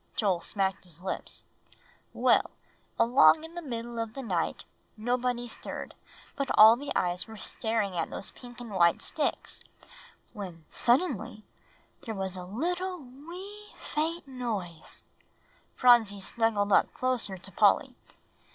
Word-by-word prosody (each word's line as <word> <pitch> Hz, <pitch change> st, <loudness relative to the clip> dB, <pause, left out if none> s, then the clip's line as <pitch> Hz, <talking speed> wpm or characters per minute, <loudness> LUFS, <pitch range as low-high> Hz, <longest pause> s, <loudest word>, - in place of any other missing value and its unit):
Joel 195 Hz, -5 st, +2 dB
smacked 195 Hz, +1 st, -1 dB
his 175 Hz, 0 st, -13 dB
lips. 190 Hz, -, -5 dB, 0.7 s
"Well, -, -, +3 dB, 0.5 s
along 255 Hz, +6 st, +6 dB
in 325 Hz, +1 st, -10 dB
the 345 Hz, -, -5 dB
middle 235 Hz, -5 st, -5 dB
of 225 Hz, -1 st, -4 dB
the 270 Hz, -, -5 dB
night, 180 Hz, -8 st, -1 dB, 0.3 s
nobody 245 Hz, +2 st, -1 dB
stirred, 235 Hz, -, -7 dB, 0.4 s
but 275 Hz, -2 st, -2 dB
all 220 Hz, +2 st, +10 dB
the 285 Hz, +3 st, -6 dB
eyes 180 Hz, +2 st, 0 dB
were 220 Hz, -1 st, -10 dB
staring 215 Hz, -2 st, -2 dB
at 165 Hz, -, -1 dB
those 195 Hz, -, -5 dB
pink 245 Hz, -1 st, -13 dB
and 240 Hz, -3 st, -8 dB
white 170 Hz, -3 st, +3 dB
sticks, 300 Hz, -, -2 dB, 0.7 s
when 180 Hz, -6 st, -8 dB
suddenly 245 Hz, -, +1 dB, 0.6 s
there 225 Hz, -, -5 dB
was 190 Hz, -1 st, -3 dB
a 180 Hz, -1 st, -7 dB
little 355 Hz, -, -2 dB
wee, 355 Hz, +10 st, -11 dB
faint 320 Hz, +1 st, -2 dB
noise." 215 Hz, -11 st, -5 dB, 0.7 s
Phronsie 235 Hz, -5 st, +5 dB
snuggled 210 Hz, 0 st, 0 dB
up -, -, +4 dB
closer 245 Hz, -7 st, -1 dB
to 180 Hz, -, -11 dB
Polly. -, -, +3 dB
230 Hz, 135 wpm, -29 LUFS, 195-270 Hz, 0.7 s, all